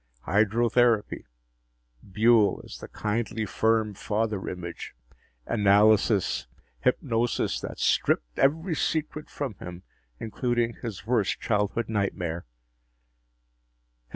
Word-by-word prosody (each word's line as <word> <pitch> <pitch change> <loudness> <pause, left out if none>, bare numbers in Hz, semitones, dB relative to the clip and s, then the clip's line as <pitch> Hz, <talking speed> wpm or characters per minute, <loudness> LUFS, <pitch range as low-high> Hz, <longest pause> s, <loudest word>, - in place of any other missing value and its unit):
Hydrotherapy... 115 +2 +2 0.8
Buehl 110 +2 +3
as - - -10
the - - -9
kindly 110 +1 -2
firm 110 0 +1
father 105 0 -2
image... 85 -2 -7 0.5
analysis... 105 - +3 0.3
hypnosis 120 -2 0
that - - -7
stripped - - 0
every 160 +6 +2
secret 150 -1 -2
from 140 -6 -4
him, 90 0 -9 0.4
including 120 +1 -1
his 110 -5 -6
worst 110 -4 0
childhood 105 +1 0
nightmare. 90 - -2
110 Hz, 90 wpm, -26 LUFS, 100-120 Hz, 0.8 s, Buehl